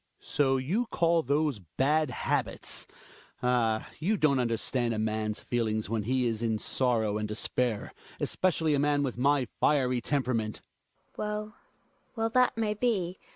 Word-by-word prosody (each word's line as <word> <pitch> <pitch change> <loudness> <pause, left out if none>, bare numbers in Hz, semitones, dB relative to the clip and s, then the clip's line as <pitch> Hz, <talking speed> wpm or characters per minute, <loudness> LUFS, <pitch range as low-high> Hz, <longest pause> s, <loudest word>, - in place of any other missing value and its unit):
Hjalmar. - - -29
So 135 -2 +2
you 175 - 0
call 170 -5 +2
those 145 -3 0 0.2
bad 150 +2 +3
habits! 125 - -2 0.6
Ah! 115 -3 +1
you 200 +7 +1
don't 145 -6 +3
understand 120 0 0
a - - -3
man's 110 0 -1
feelings, 110 -3 -1
when 115 -1 +1
he 130 +1 +1
is 115 -2 -1
in 115 -2 +1
sorrow 110 -3 0
and 105 - -2
despair 110 +1 -1
— - - -21
especially 165 -4 +1
a 145 - +2
man 145 0 +2
with 130 -3 -2
my 140 0 +3
fiery 130 -4 +2
tempera 130 -1 0
ment. 110 -2 -1
GiNA. - - -23
Well, 210 0 -3 0.6
well, 225 -1 0
that 250 -1 +3
may 215 -2 +1
be. 200 -6 -1
130 Hz, 160 wpm, -29 LUFS, 115-160 Hz, 0.6 s, bad